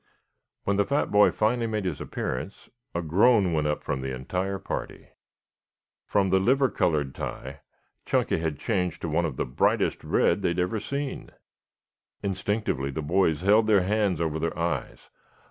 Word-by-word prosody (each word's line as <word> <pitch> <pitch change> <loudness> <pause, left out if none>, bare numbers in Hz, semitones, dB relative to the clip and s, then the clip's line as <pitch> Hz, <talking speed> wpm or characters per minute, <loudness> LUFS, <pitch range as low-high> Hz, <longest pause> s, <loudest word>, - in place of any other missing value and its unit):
When 100 0 0
the 100 - +4
fat 140 +6 0
boy 105 0 +6
finally 115 +2 0
made 110 -3 -2
his 85 -6 -3
appearance 65 +11 -5 0.2
a 85 - -1
groan 95 +3 +4
went 75 -1 +1
up 75 - -2
from 65 - -2
the 65 0 -3
entire 90 +9 -3
party. - - -6 1.0
From 100 -2 +2
the 95 +1 +4
liver 130 +6 +3
colored 75 -8 0
tie 65 +2 -6 0.5
Chunky - - +1
had 80 -3 -2
changed 90 -2 -1
to - - -1
one 85 +3 +1
of 70 -6 -4
the - - 0
brightest 60 - +1
red 90 +4 +2
they - - +1
had 85 - -1
ever 90 +5 0
seen. 140 +5 -4 0.9
Instinctively 95 -7 -1
the 75 +3 -4
boys 80 -1 +2
held 105 +3 +4
their 100 -4 +4
hands 100 -3 +1
over 80 -2 -1
their 85 - -2
eyes. 85 -7 -3
90 Hz, 165 wpm, -26 LUFS, 80-105 Hz, 1.0 s, boy